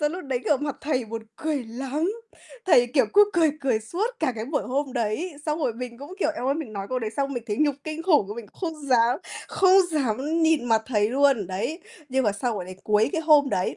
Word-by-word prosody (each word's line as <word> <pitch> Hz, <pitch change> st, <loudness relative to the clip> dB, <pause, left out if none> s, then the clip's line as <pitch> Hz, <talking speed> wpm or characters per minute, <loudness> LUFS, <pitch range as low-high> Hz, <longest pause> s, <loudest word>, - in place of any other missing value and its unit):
xong 295 Hz, +1 st, +1 dB
lúc 365 Hz, -2 st, -6 dB
đấy, 265 Hz, -3 st, -1 dB
kiểu, 295 Hz, -, +3 dB
mặt 290 Hz, +1 st, -4 dB
thầy 275 Hz, -4 st, -1 dB
buồn 225 Hz, +1 st, -6 dB
cười 300 Hz, -5 st, -2 dB
lắm, 270 Hz, -, -2 dB, 0.5 s
thầy, 245 Hz, -9 st, +6 dB
kiểu, 250 Hz, -2 st, +2 dB
cứ 415 Hz, 0 st, +6 dB
cười 330 Hz, -3 st, +4 dB
cười 255 Hz, -5 st, +1 dB
suốt 345 Hz, -, -2 dB
cả 265 Hz, -6 st, +1 dB
cái 220 Hz, -, -3 dB
buổi 285 Hz, +2 st, -1 dB
hôm 270 Hz, +1 st, -2 dB
đấy. 245 Hz, -, -2 dB
Xong 305 Hz, 0 st, 0 dB
rồi 245 Hz, -, 0 dB
mình 240 Hz, 0 st, -7 dB
cũng, 290 Hz, +6 st, -9 dB
kiểu, 305 Hz, -, +2 dB
eo 245 Hz, -, -3 dB
ơi, 275 Hz, -, +2 dB
mình 295 Hz, -9 st, -5 dB
nói 195 Hz, -1 st, -5 dB
câu 255 Hz, -, -1 dB
đấy 220 Hz, -3 st, -3 dB
xong 275 Hz, 0 st, -1 dB
mình 240 Hz, -, -3 dB
thấy 210 Hz, -, -2 dB
nhục 295 Hz, -2 st, +3 dB
kinh 310 Hz, +1 st, -5 dB
khủng. 300 Hz, -, +3 dB
Mình 235 Hz, -2 st, -7 dB
cũng -, -, -23 dB
không 305 Hz, -3 st, -11 dB
dám 245 Hz, +1 st, +4 dB, 0.3 s
không 380 Hz, 0 st, +5 dB
dám 290 Hz, +4 st, 0 dB
nhìn 320 Hz, -5 st, +3 dB
mặt 225 Hz, -2 st, +2 dB
thầy 210 Hz, -4 st, +1 dB
luôn, 270 Hz, -6 st, +3 dB
đấy. 200 Hz, -, -3 dB, 0.3 s
Nhưng 265 Hz, 0 st, +1 dB
mà 205 Hz, -, +2 dB
sau 225 Hz, +2 st, -2 dB
quả 180 Hz, -, -4 dB
đấy, 185 Hz, +1 st, -9 dB
cuối 215 Hz, +1 st, +3 dB
cái 325 Hz, -, 0 dB
hôm 300 Hz, -3 st, +5 dB
đấy, 185 Hz, -, -1 dB
265 Hz, 250 wpm, -25 LUFS, 230-305 Hz, 0.5 s, thầy